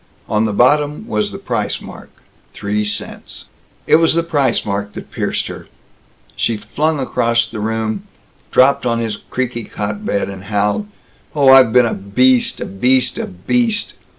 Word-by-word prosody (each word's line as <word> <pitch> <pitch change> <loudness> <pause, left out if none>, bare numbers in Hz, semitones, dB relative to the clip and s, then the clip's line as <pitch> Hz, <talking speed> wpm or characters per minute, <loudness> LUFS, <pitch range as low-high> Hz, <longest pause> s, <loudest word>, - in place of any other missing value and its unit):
On 105 +1 +1
the 110 - 0
bottom 145 - +2
was 210 -3 -1
the - - -6
price 120 - -2
mark - - -11 0.5
three 105 +1 -1
cents. 105 - -6 0.4
It - - +5
was 165 0 +3
the 170 - +2
price 140 -7 +1
mark 100 0 -3
that - - -9
pierced - - -2
her. - - -8 0.7
She 115 - 0
flung 150 +9 -1
across 115 -3 +1
the 110 -1 -7
room, 110 -1 -2 0.4
dropped 135 +2 +4
on 115 -1 +1
his 115 -2 -2
creaky 120 0 -4
cot 105 0 -5
bed, 100 - -1
howled, 100 - -2 0.5
"Oh, 140 -3 +4
I've 130 -3 +8
been 125 0 +5
a 115 - -1
beast 125 +6 +2
a - - -3
beast 125 +5 +1
a - - -3
beast! 225 - 0
115 Hz, 160 wpm, -17 LUFS, 105-140 Hz, 0.7 s, I've